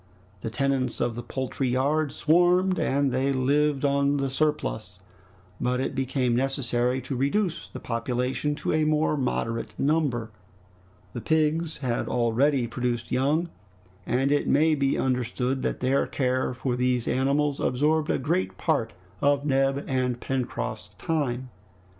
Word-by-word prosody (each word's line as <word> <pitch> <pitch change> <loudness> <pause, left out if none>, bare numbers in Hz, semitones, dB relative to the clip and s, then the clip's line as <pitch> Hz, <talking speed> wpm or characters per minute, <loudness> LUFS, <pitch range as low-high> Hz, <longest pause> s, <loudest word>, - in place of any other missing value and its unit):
The 110 - -4
tenants 135 +1 0
of 120 - 0
the 120 - -5
poultry 130 +1 -3
yard 140 +4 +1
swarmed, 180 +3 +3
and 140 0 +1
they 130 +2 +1
lived 140 +2 +1
on 140 0 +2
the 135 -1 -1
surplus, 150 - -1 0.6
but 125 +1 0
it 135 - -2
became 130 -2 0
necessary 125 -1 0
to 130 +2 -4
reduce 165 +7 0
the - - -9
population 125 +5 -1
to - - -2
a 155 0 +2
more 155 0 +2
moderate 115 -4 -2
number. 135 -7 0 0.8
The 120 - -5
pigs 160 +2 +1
had 120 -2 -1
already 125 +3 +2
produced 120 0 -3
young, 145 +7 +1 0.6
and 135 +3 +1
it 145 - +1
may 155 +3 +4
be 140 -2 +1
understood 125 +1 -1
that - - -2
their 130 +2 +2
care 130 -1 0
for 125 0 -2
these 125 -1 0
animals 140 +3 +1
absorbed 150 +4 +1
a - - +2
great 170 +7 -1
part 135 -9 0 0.3
of 145 0 +2
Neb 135 0 +1
and 125 -2 0
Pencroft's 130 -1 -3
time. 130 -6 -2
135 Hz, 140 wpm, -26 LUFS, 125-150 Hz, 0.8 s, may